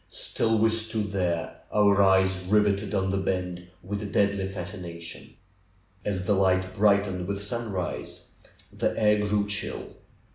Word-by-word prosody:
Still 115 -1 0
we 110 +1 +4
stood 110 -2 -1
there, 90 -4 -1
our 100 -1 +4
eyes 95 -1 +4
riveted 105 0 +2
on 95 -1 +1
the 95 - 0
bend 90 -2 -2 0.2
with 100 +3 -4
a 105 - -4
deadly 100 -1 +1
fascination. 85 -3 -7 0.7
As 95 -3 -2
the 105 - +3
light 95 -1 +2
brightened 100 -3 +2
with 100 0 -2
sunrise, 105 -5 -4 0.4
the - - 0
air 105 -1 +3
grew 105 0 +1
chill. 105 0 -4
100 Hz, 140 wpm, -27 LUFS, 95-105 Hz, 0.7 s, we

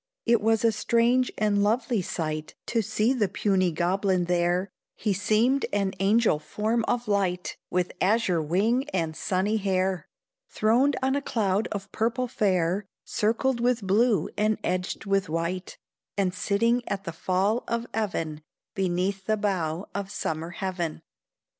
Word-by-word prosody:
It 235 -1 +4
was 225 +1 +2
a 230 - +5
strange 235 +4 +2
and 210 -1 +2
lovely 225 +1 +1
sight 155 -3 -4
To 230 - +1
see 215 +4 +1
the 220 -6 +1
puny 185 -3 +1
goblin 185 +2 +1
there; 175 +2 +1 0.2
He 210 -2 0
seemed 220 +7 +2
an 200 -1 0
angel 205 -4 +3
form 220 +8 -1
of 245 -1 0
light, 190 -3 0
With 180 -1 0
azure 190 -4 +2
wing 220 - +1
and 165 -3 -1
sunny 195 +6 0
hair, 190 -3 0 0.4
Throned 245 +6 +3
on 265 +1 +2
a 285 - 0
cloud 210 -5 0
of 200 -1 -5
purple 235 +3 0
fair, 190 -4 0 0.2
Circled 235 +4 0
with 240 -3 +1
blue 210 +3 +3
and 215 0 +2
edged 185 +3 -2
with 195 -3 +1
white, 170 +3 -3 0.4
And 190 -2 +1
sitting 230 +6 +1
at 195 -1 -2
the 170 - -5
fall 190 +7 0
of 235 0 -1
even 165 -8 -2 0.3
Beneath 190 +1 -1
the 215 0 +2
bow 185 -4 -1
of 200 -1 -3
summer 160 -3 -3
heaven. 175 -3 -4
200 Hz, 145 wpm, -26 LUFS, 180-225 Hz, 0.4 s, a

